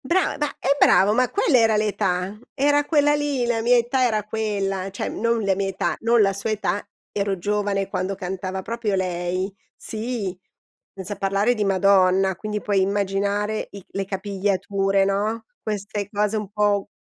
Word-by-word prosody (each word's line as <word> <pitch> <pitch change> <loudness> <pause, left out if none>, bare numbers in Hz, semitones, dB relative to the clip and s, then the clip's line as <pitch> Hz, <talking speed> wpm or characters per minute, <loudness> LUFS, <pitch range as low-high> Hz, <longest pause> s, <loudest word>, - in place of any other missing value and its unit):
Bra 345 +8 +1
ma 295 - 0
eh, 280 - +1
bravo, 200 -5 +5
ma 250 +3 +2
quella 335 -9 +3
era 225 -2 +4
l'età. 200 -2 -1 0.2
Era 290 +1 +3
quella 295 -1 +3
lì, 290 -4 0
la 230 -1 0
mia 245 +2 +4
età 245 +2 +2
era 215 -4 +1
quella, 200 -3 -2
cioè 195 - -4
non 230 -1 0
la 195 -1 +2
mia 195 0 -1
età, 190 0 -1
non 230 0 +3
la 195 -1 +3
sua 200 +3 -3
età. 205 -2 -1 0.3
Ero 200 -2 -1
giovane 200 0 -1
quando 195 0 -2
cantava 190 0 -4
proprio 230 -1 -2
lei, 185 +1 -1 0.2
sì, 220 -4 -4 0.6
senza 195 +1 -6
parlare 200 +4 +1
di 215 -3 -1
Madonna, 190 -1 +3
quindi 210 +1 -4
puoi 200 -2 +1
immaginare 200 +2 0
i 200 -2 -10
le 195 - -3
capigliature, 195 0 0
no, 205 +4 -1 0.2
queste 205 -1 -3
cose 210 0 0
un 210 -2 -4
po' 205 -1 +1
205 Hz, 165 wpm, -23 LUFS, 195-220 Hz, 0.6 s, bravo